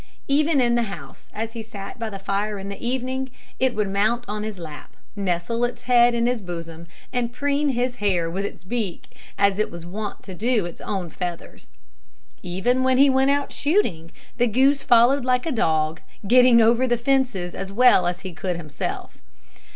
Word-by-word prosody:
Even 290 +1 +2
in 240 -2 +3
the 240 - +2
house, 150 -8 -10
as 225 +1 -4
he 230 -1 -6
sat 215 0 -9
by 225 -1 -3
the 200 - -6
fire 200 +2 -2
in 195 0 -6
the 200 - -8
evening, 260 +2 -2 0.3
it 260 -1 +1
would 210 -1 0
mount 215 +5 0
on 210 0 -3
his 215 -2 -5
lap, 155 -4 -10 0.2
nestle 195 +4 -1
its 240 0 -2
head 240 -1 +4
in 235 0 +1
his 245 -2 0
bosom, 170 -2 -7 0.3
and 240 -2 -1
preen 285 +3 0
his 245 -1 -1
hair 185 -6 +1
with 185 +4 -3
its 200 - -6
beak, 200 -2 -4 0.2
as 200 0 +2
it 215 - +1
was 170 -1 -9
wont 205 +4 -6
to 190 - -9
do 220 +1 0
its 175 - -8
own 185 -5 -4
feathers. 175 - -6 0.7
Even 205 +9 0
when 260 0 +3
he 275 +1 +6
went 265 +1 +3
out 285 0 0
shooting, 230 - 0 0.3
the 245 0 +3
goose 270 +5 +3
followed 245 +3 +4
like 250 0 +1
a 325 - -1
dog, 160 - 0 0.3
getting 245 0 +6
over 235 +3 +3
the 240 -1 +2
fences 245 -8 0
as 195 - -6
well 240 -4 +5
as 175 +1 -3
he 185 -2 -7
could 180 +2 -3
himself. 150 -4 -6
225 Hz, 190 wpm, -23 LUFS, 185-250 Hz, 0.7 s, he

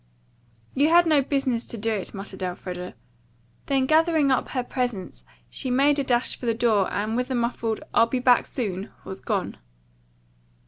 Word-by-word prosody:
"You 290 +3 +3
had 345 +1 +6
no 305 -3 +4
business 265 -4 -1
to 235 - -7
do 225 +2 -1
it," 200 -3 -4
muttered 195 -1 -8
Elfreda. 180 0 -5 0.7
Then 270 -1 +2
gathering 315 -1 +3
up 260 - +1
her 255 - -2
presents 245 -7 -4 0.2
she 265 - -5
made 280 +3 +3
a - - +1
dash 245 -2 +1
for 245 - -7
the 230 - +1
door 220 -5 +2
and 215 +2 -2
with 250 +2 -1
a 260 - -1
muffled, 235 -2 -1
"I'll 230 - +5
be 255 - -1
back 250 -1 +4
soon," 200 -5 -3 0.2
was 190 - -7
gone. - - -2
245 Hz, 175 wpm, -25 LUFS, 210-270 Hz, 0.7 s, had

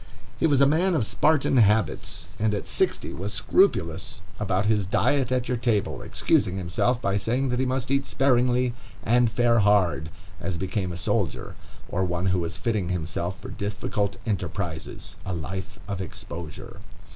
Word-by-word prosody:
He - - +4
was 140 -3 +3
a - - +8
man 170 +6 +3
of 125 - +1
Spartan 150 +2 +2
habits, 105 -7 +2
and 105 -1 +2
at 100 - -4
sixty - - 0
was 100 +3 -4
scrupulous 95 - +1 0.2
about 100 -1 0
his 105 -3 +2
diet 130 +5 +2
at 125 -1 0
your 125 0 0
table, 115 -4 0
excusing 95 +1 +1
himself 95 +7 0
by 100 -3 0
saying 125 +6 0
that 125 0 0
he 130 - +1
must 130 0 -1
eat 140 0 +1
sparingly 125 -2 +2 0.3
and 120 +1 +4
fare 115 0 +3
hard, 90 -8 +3 0.3
as 95 -3 -3
became 95 +1 -2
a 85 - -5
soldier - - -1 0.3
or 95 - -1
one 90 0 -1
who 90 - +2
was 85 0 -3
fitting 105 -7 -1
himself 85 +2 -2
for 100 - -8
difficult 100 0 -2
enterprises, 90 -5 -4
a 95 - -3
life 90 +4 -5
of 100 -2 -3
exposure. 85 -3 -8
105 Hz, 165 wpm, -25 LUFS, 90-125 Hz, 0.3 s, a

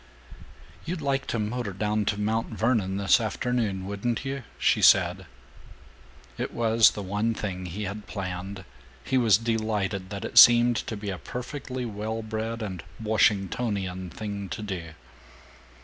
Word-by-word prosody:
"You'd 170 +1 -4
like 140 -2 -1
to - - -1
motor 110 -1 -2
down 105 +2 0
to 100 0 -1
Mount 110 +2 0
Vernon 110 -4 0
this 100 +4 +4
afternoon, 110 -3 -1
wouldn't 100 +6 -2
you?" 135 0 -3 0.2
she - - +2
said. - - +5 1.1
It - - -2
was 115 -1 +5
the 105 - -5
one 105 +4 -1
thing 95 -4 -4
he 95 +5 -5
had 105 +2 -6
planned. 95 -1 -5 0.4
He 130 -1 +1
was 110 -5 +5
delighted 105 -4 -1
that 100 -1 -5
it 120 - +5
seemed 120 0 +8
to 110 - -4
be 100 -1 -4
a 90 - -6
perfectly 125 - -5
well 110 +1 -4
bred 110 +1 -4
and 95 -4 -5 0.2
Washingtonian 100 -3 0
thing 100 0 -6
to 110 - -5
do. 90 -6 -5
105 Hz, 150 wpm, -26 LUFS, 100-115 Hz, 1.1 s, seemed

